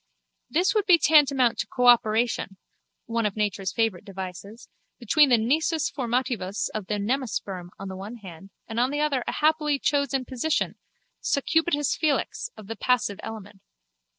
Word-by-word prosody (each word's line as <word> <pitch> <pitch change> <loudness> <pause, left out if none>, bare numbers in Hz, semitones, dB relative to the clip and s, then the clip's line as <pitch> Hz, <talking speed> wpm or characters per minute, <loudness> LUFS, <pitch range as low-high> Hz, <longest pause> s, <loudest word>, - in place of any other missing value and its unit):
This 360 +5 +2
would 425 -3 0
be 355 -3 +7
tantamount 275 -6 +4
to - - 0
a - - -52
cooperation 235 -4 +3 0.5
(one 230 -1 0
of 200 - -6
nature's 205 -3 -1
favourite 225 -6 -1
devices) 195 +2 -8 0.3
between 275 +5 +4
the 245 - +5
nisus 305 +7 0
formativus 240 -6 -2
of 215 -3 -5
the 210 - -1
nemasperm 205 -5 -3
on 195 - -7
the 190 - -6
one 200 +5 -7
hand 195 -4 -12 0.2
and 225 +1 -3
on 250 +2 +2
the 290 +1 -2
other 285 -4 0
a - - 0
happily 300 -1 +2
chosen 275 -2 0
position, 260 +6 -1 0.5
succubitus 295 0 +1
felix, 310 - -1
of 215 - -11
the 225 +3 -6
passive 225 -6 0
element. 205 -3 -9
240 Hz, 155 wpm, -25 LUFS, 205-285 Hz, 0.5 s, be